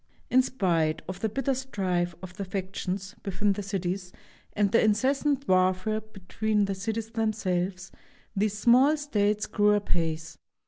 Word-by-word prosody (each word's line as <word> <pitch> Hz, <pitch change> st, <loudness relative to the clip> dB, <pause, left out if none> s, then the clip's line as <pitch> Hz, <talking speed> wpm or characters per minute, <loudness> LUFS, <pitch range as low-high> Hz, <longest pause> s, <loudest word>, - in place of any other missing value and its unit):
In 255 Hz, -, +6 dB
spite 170 Hz, -11 st, 0 dB
of 185 Hz, +1 st, -5 dB
the 220 Hz, -, 0 dB
bitter 270 Hz, +4 st, 0 dB
strife 185 Hz, -9 st, -1 dB
of 185 Hz, -1 st, -8 dB
the 200 Hz, -, -4 dB
factions 190 Hz, 0 st, -4 dB
within 200 Hz, +1 st, +1 dB
the 205 Hz, -, -4 dB
cities 190 Hz, -2 st, -3 dB, 0.4 s
and 205 Hz, -2 st, +1 dB
the 230 Hz, -, +4 dB
incessant 270 Hz, +6 st, +1 dB
warfare 185 Hz, +3 st, +2 dB
between 215 Hz, 0 st, -1 dB
the 195 Hz, -, -2 dB
cities 220 Hz, +3 st, -3 dB
themselves, 190 Hz, -4 st, -1 dB, 0.4 s
these 205 Hz, +1 st, 0 dB
small 255 Hz, +7 st, +5 dB
states 210 Hz, -8 st, 0 dB
grew 210 Hz, 0 st, +3 dB
apace. 165 Hz, -5 st, -2 dB
200 Hz, 140 wpm, -27 LUFS, 185-220 Hz, 0.4 s, In